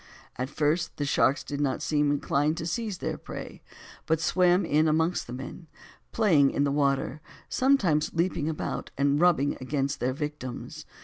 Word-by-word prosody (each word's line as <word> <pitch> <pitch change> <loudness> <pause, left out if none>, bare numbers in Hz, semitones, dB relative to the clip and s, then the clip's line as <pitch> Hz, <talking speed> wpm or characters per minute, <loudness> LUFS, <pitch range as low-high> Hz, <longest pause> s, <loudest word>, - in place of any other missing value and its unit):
At 130 +1 -3
first 155 +4 0
the 145 - -1
sharks 140 0 +2
did 145 0 -4
not 140 -2 -1
seem 150 -1 +1
inclined 145 +2 +1
to 160 - -4
seize 205 +3 -3
their - - -4
prey, - - -8 0.5
but 160 0 +2
swam 180 +2 +3
in 155 +2 +3
amongst 160 +3 +1
the - - -8
men, 135 +6 -8 0.4
playing 165 -11 +4
in 140 - 0
the 140 - +1
water, 140 0 0 0.3
sometimes 200 - +2
leaping 165 -3 0
about 155 - -4
and 140 +2 +2
rubbing 155 -5 +3
against 140 +1 -2
their 130 +1 0
victims. 145 -3 -6
150 Hz, 165 wpm, -27 LUFS, 140-170 Hz, 0.5 s, playing